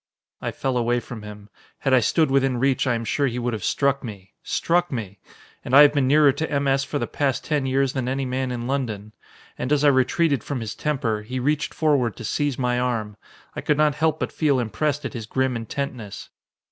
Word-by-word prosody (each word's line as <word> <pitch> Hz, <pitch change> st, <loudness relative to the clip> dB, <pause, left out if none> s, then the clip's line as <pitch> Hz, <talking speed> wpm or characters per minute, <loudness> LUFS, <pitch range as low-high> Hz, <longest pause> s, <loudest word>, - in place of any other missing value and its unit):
I -, -, -2 dB
fell 130 Hz, -2 st, -2 dB
away 120 Hz, 0 st, +1 dB
from 120 Hz, -1 st, -9 dB
him. 105 Hz, -1 st, -10 dB, 0.3 s
Had 135 Hz, -, +1 dB
I 130 Hz, -, +7 dB
stood 150 Hz, +5 st, +2 dB
within 135 Hz, -2 st, +2 dB
reach, 135 Hz, +1 st, +1 dB
I 120 Hz, -, +2 dB
am 115 Hz, 0 st, -4 dB
sure 140 Hz, +6 st, +1 dB
he 120 Hz, -1 st, -3 dB
would 120 Hz, 0 st, -1 dB
have 110 Hz, -, -4 dB
struck 140 Hz, -1 st, +1 dB
me. 100 Hz, -4 st, -9 dB
Struck 175 Hz, +1 st, 0 dB
me! 105 Hz, -6 st, -5 dB, 0.4 s
And 130 Hz, -, 0 dB
I 145 Hz, -, +11 dB
have 145 Hz, 0 st, +5 dB
been 140 Hz, -3 st, +2 dB
nearer 145 Hz, +1 st, +6 dB
to 160 Hz, +4 st, -4 dB
M. 140 Hz, -1 st, 0 dB
S. 135 Hz, 0 st, +2 dB
for 145 Hz, -, -3 dB
the -, -, -1 dB
past 140 Hz, -3 st, -1 dB
ten 150 Hz, -3 st, 0 dB
years 135 Hz, 0 st, +1 dB
than 130 Hz, -2 st, -2 dB
any 135 Hz, +1 st, -1 dB
man 130 Hz, 0 st, -2 dB
in 120 Hz, -1 st, -4 dB
London. 110 Hz, -6 st, -3 dB, 0.5 s
And 125 Hz, -, -3 dB
as 150 Hz, -1 st, +3 dB
I 145 Hz, -, +7 dB
retreated 140 Hz, +1 st, +2 dB
from 140 Hz, -3 st, -3 dB
his 110 Hz, -2 st, -5 dB
temper, 130 Hz, -8 st, -1 dB
he 125 Hz, +5 st, -5 dB
reached 145 Hz, +3 st, 0 dB
forward 140 Hz, -8 st, +2 dB
to 115 Hz, -, -8 dB
seize 145 Hz, +4 st, -1 dB
my 125 Hz, -1 st, 0 dB
arm. 115 Hz, -4 st, -2 dB, 0.4 s
I -, -, -4 dB
could 150 Hz, -, +1 dB
not 150 Hz, -1 st, +3 dB
help 160 Hz, +1 st, 0 dB
but -, -, -2 dB
feel 145 Hz, -4 st, +1 dB
impressed 145 Hz, +5 st, -1 dB
at -, -, -4 dB
his 115 Hz, -4 st, -6 dB
grim 130 Hz, +1 st, 0 dB
intentness. 115 Hz, -2 st, -5 dB
130 Hz, 225 wpm, -23 LUFS, 120-145 Hz, 0.5 s, I